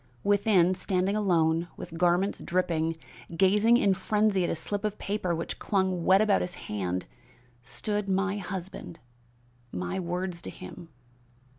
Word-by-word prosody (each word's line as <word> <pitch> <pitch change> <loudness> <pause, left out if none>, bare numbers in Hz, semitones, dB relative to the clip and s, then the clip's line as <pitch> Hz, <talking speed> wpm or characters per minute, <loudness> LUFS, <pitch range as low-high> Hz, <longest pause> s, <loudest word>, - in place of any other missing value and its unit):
Within, 200 -3 +4
standing 185 +1 0
alone, 170 -5 +2
with 165 - -8
garments 180 +3 +2
dripping, 165 -3 0 0.4
gazing 210 +5 +5
in 200 -5 +3
frenzy 210 0 +1
at - - 0
a - - 0
slip 200 +6 -4
of 210 -1 -2
paper 195 -4 -1
which 165 - -4
clung 190 -4 0
wet 190 +2 +6
about 210 -2 +3
his 180 0 -3
hand, 90 -3 -3 0.6
stood 200 - -3
my 195 +1 +1
husband. 185 -2 -6 0.7
My 90 - -3
words 180 0 -3
to - - -5
him! 170 -2 -10
185 Hz, 140 wpm, -28 LUFS, 170-200 Hz, 0.7 s, wet